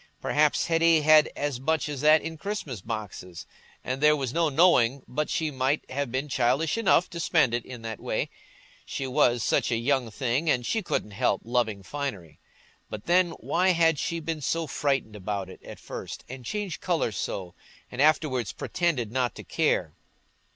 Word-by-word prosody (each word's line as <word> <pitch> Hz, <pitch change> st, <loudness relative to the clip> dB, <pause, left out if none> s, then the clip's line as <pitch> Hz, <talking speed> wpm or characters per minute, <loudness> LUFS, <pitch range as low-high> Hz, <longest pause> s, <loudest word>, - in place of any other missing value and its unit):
Perhaps 150 Hz, 0 st, +2 dB
Hetty 165 Hz, -1 st, +4 dB
had 155 Hz, 0 st, +7 dB
had -, -, -11 dB
as 145 Hz, -4 st, -2 dB
much 160 Hz, +4 st, 0 dB
as 145 Hz, -3 st, -5 dB
that 155 Hz, +1 st, +5 dB
in 165 Hz, +1 st, -5 dB
Christmas 160 Hz, -, -5 dB
boxes, 95 Hz, -5 st, -6 dB, 0.4 s
and 130 Hz, +2 st, -3 dB
there 150 Hz, 0 st, +6 dB
was 135 Hz, -4 st, -3 dB
no 165 Hz, -1 st, +2 dB
knowing 140 Hz, -5 st, +4 dB
but 150 Hz, +4 st, -2 dB
she 160 Hz, -2 st, -1 dB
might 135 Hz, +2 st, 0 dB
have 140 Hz, -1 st, -2 dB
been 130 Hz, +3 st, -2 dB
childish 135 Hz, +4 st, +1 dB
enough 195 Hz, -6 st, +3 dB
to 170 Hz, -, -6 dB
spend 160 Hz, -7 st, +2 dB
it 120 Hz, -1 st, -1 dB
in 125 Hz, -3 st, -10 dB
that 110 Hz, -1 st, -5 dB
way; -, -, -2 dB, 0.5 s
she 135 Hz, -, -4 dB
was 125 Hz, -4 st, +2 dB
such -, -, +1 dB
a 115 Hz, -, +2 dB
young 125 Hz, 0 st, 0 dB
thing, 130 Hz, +7 st, -1 dB
and 125 Hz, -4 st, +1 dB
she 225 Hz, -, 0 dB
couldn't 105 Hz, -, -2 dB
help 100 Hz, -, 0 dB
loving 110 Hz, -4 st, -1 dB
finery! 100 Hz, -, -5 dB, 0.5 s
But 105 Hz, -1 st, -7 dB
then, 175 Hz, 0 st, +3 dB
why 185 Hz, +2 st, +1 dB
had 165 Hz, -3 st, +3 dB
she 170 Hz, -, -2 dB
been 160 Hz, -1 st, -4 dB
so 165 Hz, +3 st, -1 dB
frightened 135 Hz, -7 st, -1 dB
about 100 Hz, -1 st, -4 dB
it -, -, -14 dB
at -, -, -10 dB
first, -, -, -8 dB
and 130 Hz, 0 st, -9 dB
changed 200 Hz, -, -4 dB
colour 170 Hz, -10 st, 0 dB
so, 95 Hz, -3 st, -4 dB, 0.4 s
and 125 Hz, -, -2 dB
afterwards 145 Hz, -7 st, +2 dB
pretended 145 Hz, -11 st, -1 dB
not 125 Hz, -2 st, 0 dB
to -, -, -9 dB
care? -, -, 0 dB
140 Hz, 185 wpm, -27 LUFS, 120-160 Hz, 0.5 s, had